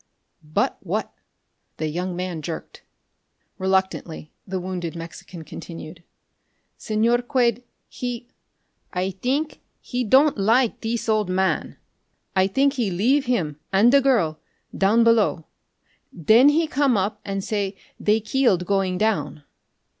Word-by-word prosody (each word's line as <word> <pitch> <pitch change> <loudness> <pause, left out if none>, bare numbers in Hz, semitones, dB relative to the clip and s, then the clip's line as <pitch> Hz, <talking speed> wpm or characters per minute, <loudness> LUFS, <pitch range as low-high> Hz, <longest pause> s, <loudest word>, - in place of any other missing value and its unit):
"But 150 0 -1
what?" - - -3 0.7
the 155 - -2
young 175 +3 -3
man 180 -3 -4
jerked. 160 +2 -7 0.8
Reluctantly 190 -5 -1 0.2
the 190 0 -3
wounded 180 -2 -4
Mexican 165 0 -9
continued. 165 +2 -9 0.8
"Señor 235 +3 +1
Quade 245 -2 +1 0.2
he 245 -1 -5 0.6
I 185 +1 -1
think 265 - -2 0.2
he 250 0 -3
don' 270 +6 +5
like 225 +4 +2
thees 230 +1 -2
old 215 -3 +1
man. 190 +1 0 0.6
I 190 0 +4
think 275 +7 +2
he 240 -7 -1
leave 245 +11 +2
heem 160 - -1
an' 205 +5 +5
the 280 0 +6
girl 215 - +2 0.4
down 215 +4 +4
below. 225 -8 +3 0.7
Then 220 - +5
he 320 +3 +2
come 275 -5 +2
up 205 +2 -2
an' 195 0 -3
say 200 -1 -2 0.2
they 215 +1 +2
keeled 215 -6 +1
going 195 -1 0
down." 155 -9 -1
200 Hz, 125 wpm, -23 LUFS, 180-240 Hz, 0.8 s, the